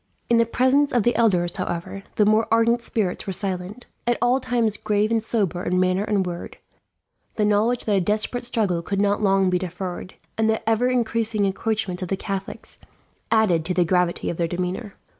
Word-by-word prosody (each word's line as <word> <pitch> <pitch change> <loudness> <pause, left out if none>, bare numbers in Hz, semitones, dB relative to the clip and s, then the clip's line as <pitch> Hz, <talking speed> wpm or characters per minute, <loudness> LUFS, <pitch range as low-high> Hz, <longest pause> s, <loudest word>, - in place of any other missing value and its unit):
In 235 - +4
the 230 0 +3
presence 260 +4 +2
of 240 -3 +2
the 240 - +2
elders, 180 -5 +2
however, 180 +1 -4
the 210 - +3
more 215 +2 +3
ardent 230 +1 +3
spirits 205 -6 -2
were 195 - -2
silent. 190 +4 -4 0.2
At 240 - +2
all 250 +2 +2
times 235 -4 0
grave 210 +1 0
and 225 -1 +2
sober 200 -6 -1
in 180 0 0
manner 185 +1 +2
and 205 -3 0
word, 175 -1 -6 0.8
the 210 - +1
knowledge 215 +4 +1
that 210 - +2
a - - +2
desperate 215 +6 0
struggle 210 -8 0
could 195 +3 -3
not 205 +1 +1
long 195 -2 +3
be 180 - +1
deferred, 180 0 -6 0.2
and 220 0 +3
the 220 0 -1
ever 225 +2 +2
increasing 230 -4 0
encroachments 195 -2 -2
of 180 - -4
the 195 - -1
Catholics, 195 -1 -6 0.5
added 210 -8 +3
to 180 +1 -1
the 180 - +3
gravity 180 0 +1
of 170 - -7
their 170 - 0
demeanour. 180 +4 -4
205 Hz, 195 wpm, -23 LUFS, 185-225 Hz, 0.8 s, In